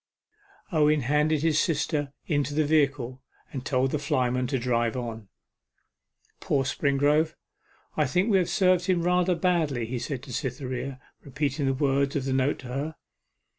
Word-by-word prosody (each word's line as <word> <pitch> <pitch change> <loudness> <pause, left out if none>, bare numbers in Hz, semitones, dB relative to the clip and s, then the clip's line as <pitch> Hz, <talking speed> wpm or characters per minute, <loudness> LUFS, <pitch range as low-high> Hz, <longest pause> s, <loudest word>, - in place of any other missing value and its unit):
Owen 150 -2 +3
handed 150 +3 +1
his 155 -2 +3
sister 150 -3 0
into 145 -1 -1
the 155 0 +2
vehicle, 140 -4 +1 0.3
and 130 -3 -4
told 130 -2 +1
the 150 - -1
flyman 130 -4 0
to 135 +1 0
drive 120 -1 0
on. 115 -4 -6 1.1
'Poor 135 -2 +1
Springrove 145 +4 +1 0.6
I 150 -3 +2
think 180 - +1
we 195 - +5
have 180 - 0
served 185 -2 +3
him 180 -3 +2
rather 180 0 +2
badly,' 160 -8 +1
he 120 +2 -4
said 125 +1 -4
to 135 -3 -9
Cytherea, 130 +1 -4 0.2
repeating 140 +1 -2
the 135 - +1
words 140 0 +1
of 135 -2 -1
the 135 - -1
note 135 +2 +1
to 130 - -9
her. 145 +5 -3
140 Hz, 160 wpm, -27 LUFS, 130-155 Hz, 1.1 s, we